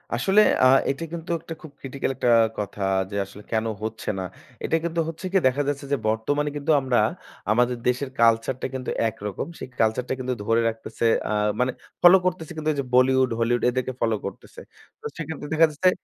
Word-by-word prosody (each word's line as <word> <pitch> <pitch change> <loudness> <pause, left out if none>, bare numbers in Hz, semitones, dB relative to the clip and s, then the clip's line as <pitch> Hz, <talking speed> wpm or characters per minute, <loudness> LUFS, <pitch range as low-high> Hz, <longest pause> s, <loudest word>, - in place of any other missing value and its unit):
আসলে 190 - +4 0.2
আ 130 - +8 0.2
এইটা 140 +4 -2
কিন্তু 170 0 -6
একটা 165 - -8
খুব 160 - -11
ক্রিটিক্যাল 135 0 -3
একটা 120 - 0 0.3
কথা 105 0 -5 0.3
যে - - -5
আসলে 100 +2 -13
কেনো 110 0 0
হচ্ছে 110 0 -4
না? 95 - -2 0.4
এইটা 165 - +1
কিন্তু 170 0 -2
হচ্ছে 165 +3 -8
কি? 195 - +5
দেখা 130 +3 +1
যাচ্ছে 140 -1 -2
যে - - +3
বর্তমানে 145 +7 0
কিন্তু 145 +2 0
আমরা 130 -3 +1 0.5
আমাদের 120 +2 +2
দেশের 125 +2 0
কালচারটা 115 +3 +2
কিন্তু 130 -1 -4 0.2
একরকম। 105 -2 -5
সেই - - -6
কালচারটা 115 +3 +1
কিন্তু 130 0 -2
ধরে 115 +2 +3
রাখতেছে 115 +1 -5 0.2
আ - - -1 0.3
মানে 125 +1 +2 0.3
ফলো 180 +2 +9
করতেছে 175 -3 -2
কিন্তু 155 0 -1
যে - - 0
Bollywood 130 0 +4
Hollywood 120 +1 +1
এদেরকে 130 +1 -2
ফলো 115 -1 +2
করতেছে। 100 - -8 0.4
তো - - -15
সেইক্ষেত্রে 160 -2 -6
দেখা 160 +1 +6
যাচ্ছে 170 +5 +3
130 Hz, 185 wpm, -24 LUFS, 115-150 Hz, 0.5 s, ফলো